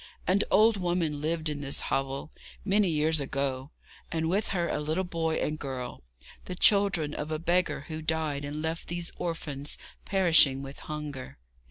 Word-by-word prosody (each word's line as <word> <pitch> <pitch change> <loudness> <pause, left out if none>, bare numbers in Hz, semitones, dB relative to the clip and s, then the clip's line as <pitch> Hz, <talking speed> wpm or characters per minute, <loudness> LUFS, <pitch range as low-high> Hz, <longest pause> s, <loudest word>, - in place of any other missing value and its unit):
An 190 +2 +3
old 220 0 +5
woman 175 -5 0
lived 160 +1 -1
in 150 -1 -2
this 140 -1 -2
hovel, 135 +2 -2 0.3
many 205 -1 +3
years 155 0 +2
ago, 135 -1 -2 0.4
and 160 -1 0
with 195 +5 +1
her 175 -3 0
a - - -1
little 155 +5 0
boy 165 -3 -1
and 155 0 -1
girl, 130 -3 -5 0.4
the 180 - -5
children 195 -7 +4
of 150 - -4
a 155 - -1
beggar 175 0 +1
who 155 +2 -6
died 155 -2 -1
and 150 +2 -4
left 160 +1 -3
these 175 0 -3
orphans 150 -4 -2 0.3
perishing 165 -8 +4
with 135 +1 -8
hunger. 150 -4 -6
160 Hz, 165 wpm, -29 LUFS, 145-175 Hz, 0.4 s, old